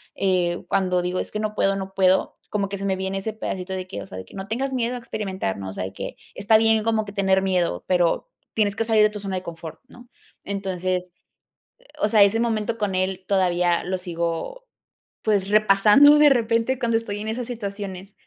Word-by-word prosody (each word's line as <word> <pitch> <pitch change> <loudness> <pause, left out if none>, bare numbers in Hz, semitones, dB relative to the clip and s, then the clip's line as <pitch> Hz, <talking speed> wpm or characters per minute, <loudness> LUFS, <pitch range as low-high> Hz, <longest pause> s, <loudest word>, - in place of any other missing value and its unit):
Eh, 180 -3 0
cuando 185 -2 +1
digo 180 +1 -2
es - - -7
que 215 - -3
no 215 0 -3
puedo, 195 -1 +2
no 190 0 -6
puedo, 190 -1 +2
como 200 -1 -1
que 200 - -4
se 195 - -5
me 190 -1 0
viene 190 +1 -2
ese 220 +3 -3
pedacito 190 -3 -5
de 185 0 -4
que, 100 - -6
o - - -13
sea, 95 - -9
de 95 - -8
que - - -16
no 195 0 -6
tengas 265 +4 -2
miedo 245 -1 -1
a - - -5
experimentar, 195 - -4
¿no? 95 -1 -6
O - - -7
sea, 95 - -4
de 95 - -7
que - - -7 0.2
está 205 +3 +4
bien 220 0 +3
como 220 -1 +1
que 200 - -9
tener 190 -1 +2
miedo, 180 - 0
pero 180 - +1 0.3
tienes 205 -2 +1
que 225 - 0
salir 220 -1 +3
de 210 - +5
tu 210 0 -7
zona 195 -1 -4
de - - -4
confort, 165 -2 -8
¿no? 245 0 -16 0.3
Entonces, 185 -2 -3 0.7
eh, - - -26 0.2
o 210 - +2
sea, 215 -1 +5
ese 200 +3 +3
momento 230 -1 -1
con 205 -4 -1
él, 185 0 -1
todavía 180 -3 +2
lo 185 +1 -1
sigo, 175 - -4 0.6
pues, 205 -3 +1
repasando 215 +8 +6
de 300 0 +7
repente 235 0 +1
cuando 230 -3 +1
estoy 205 -2 -4
en 215 - -4
esas 235 +2 -3
situaciones. 200 -4 -6
195 Hz, 225 wpm, -23 LUFS, 185-220 Hz, 0.7 s, de